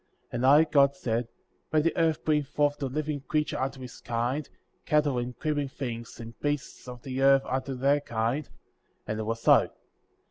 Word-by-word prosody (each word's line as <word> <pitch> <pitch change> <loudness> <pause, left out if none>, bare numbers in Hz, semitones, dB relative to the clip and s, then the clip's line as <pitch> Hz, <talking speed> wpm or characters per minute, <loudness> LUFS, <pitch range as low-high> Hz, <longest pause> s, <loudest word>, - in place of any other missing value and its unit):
24. - - -6
And 120 +2 0
I, 145 +3 +7
God, 140 -2 +5
said: 120 -3 -2 0.4
Let 155 -1 +3
the 165 - +1
earth 165 -2 +1
bring 150 -1 +3
forth 145 0 0
the 140 - -1
living 150 +1 -3
creature 150 -1 0
after 135 0 -2
his 125 -2 -10
kind, 120 +5 -2 0.3
cattle, 150 -4 +2
and 120 0 -5
creeping 145 -1 -1
things, 120 -4 -6
and 115 0 -8
beasts 145 -3 -3
of 125 -1 -9
the 130 0 -3
earth 135 0 +6
after 130 +1 -2
their 140 +3 +3
kind, 120 +4 -2 0.6
and 110 0 -3
it - - -2
was 115 +1 -3
so; - - +8
25. - - -27
135 Hz, 190 wpm, -28 LUFS, 120-145 Hz, 0.6 s, so